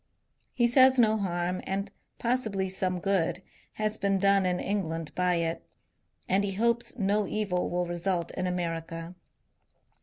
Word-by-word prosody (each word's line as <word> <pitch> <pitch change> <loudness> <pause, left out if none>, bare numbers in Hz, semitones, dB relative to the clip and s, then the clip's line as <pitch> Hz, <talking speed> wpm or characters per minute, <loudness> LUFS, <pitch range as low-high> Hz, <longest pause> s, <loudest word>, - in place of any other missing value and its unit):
He 240 - +3
says 260 +2 +6
no 220 -3 +4
harm, 180 -3 -2
and 195 +1 -2 0.3
possibly 220 -6 0
some 185 -1 0
good, 180 -1 0 0.3
has 215 0 -2
been 195 -1 +1
done 195 -1 +3
in 180 0 0
England 165 -6 -3
by 180 -1 +2
it; 165 0 -2 0.6
and 195 +2 +2
he 200 -1 -2
hopes 235 +4 +1
no 205 -1 +1
evil 200 -4 -1
will 180 0 -1
result 175 0 -2
in 185 -1 -2
America. 165 -1 -4
190 Hz, 145 wpm, -28 LUFS, 175-210 Hz, 0.6 s, says